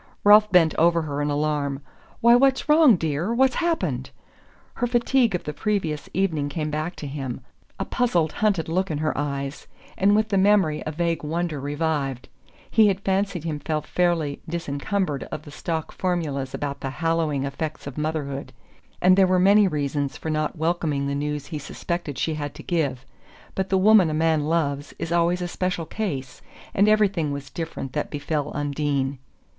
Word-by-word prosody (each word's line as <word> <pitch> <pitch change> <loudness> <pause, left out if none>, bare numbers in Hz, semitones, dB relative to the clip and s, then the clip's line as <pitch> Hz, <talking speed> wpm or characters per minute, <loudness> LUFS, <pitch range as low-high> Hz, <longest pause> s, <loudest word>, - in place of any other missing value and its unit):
Ralph 210 0 +7
bent 165 -4 +5
over 170 0 +4
her 145 -1 -3
in 145 - 0
alarm. 145 -1 -1 0.4
"Why, 235 +1 +7
what's 265 +1 +3
wrong, 300 -6 +7
dear? 160 +4 -1
What's 265 +1 +4
happened?" 340 -1 -1 0.6
Her 245 - -1
fatigue 240 -2 +2
of 180 - -3
the 150 - -4
previous 170 -7 -2
evening 160 -7 0
came 150 +1 -3
back 155 +4 -3
to - - -7
him 135 -3 -5 0.4
a - - -1
puzzled 175 -11 +1
hunted 200 -5 0
look 185 +4 0
in 155 - -2
her 155 0 -1
eyes; 140 -1 -4 0.3
and 200 +2 +3
with 215 +1 +2
the 195 -2 +2
memory 190 -6 +3
a - - -1
vague 170 +1 -1
wonder 160 0 -2
revived. 145 -3 -2 0.4
He 220 -1 +6
had 195 -1 0
fancied 195 -3 0
himself 155 -1 -3
fairly 165 -4 0
disencumbered 165 0 -2
of 155 - -7
the 145 - -11
stock 160 +1 -4
formulas 150 -8 -2
about 140 -1 -4
the 135 - -3
hallowing 165 -2 0
effects 150 +3 -4
of 140 -2 -7
motherhood, 150 -3 -3 0.5
and 185 +1 +7
there 190 -1 +5
were 185 0 +3
many 200 +3 +5
reasons 145 -3 -2
for 160 - -4
not 155 +2 -1
welcoming 160 -3 0
the 140 - -1
news 145 0 -2
he 155 -1 -5
suspected 155 +1 -4
she 160 - 0
had 145 -2 -5
to - - -10
give; 140 -7 -1 0.5
but 190 0 -2
the 190 - +3
woman 195 -2 +6
a 155 - -2
man 160 -1 +2
loves 145 -3 -1
is 165 - -4
always 175 +1 +2
a - - -2
special 180 -1 -2
case, 150 -11 -4 0.3
and 200 +2 +4
everything 200 -8 +2
was 140 0 -6
different 160 -5 -5
that 150 - -2
befell 145 0 -2
Undine. 140 -2 -1
160 Hz, 175 wpm, -24 LUFS, 145-185 Hz, 0.6 s, Ralph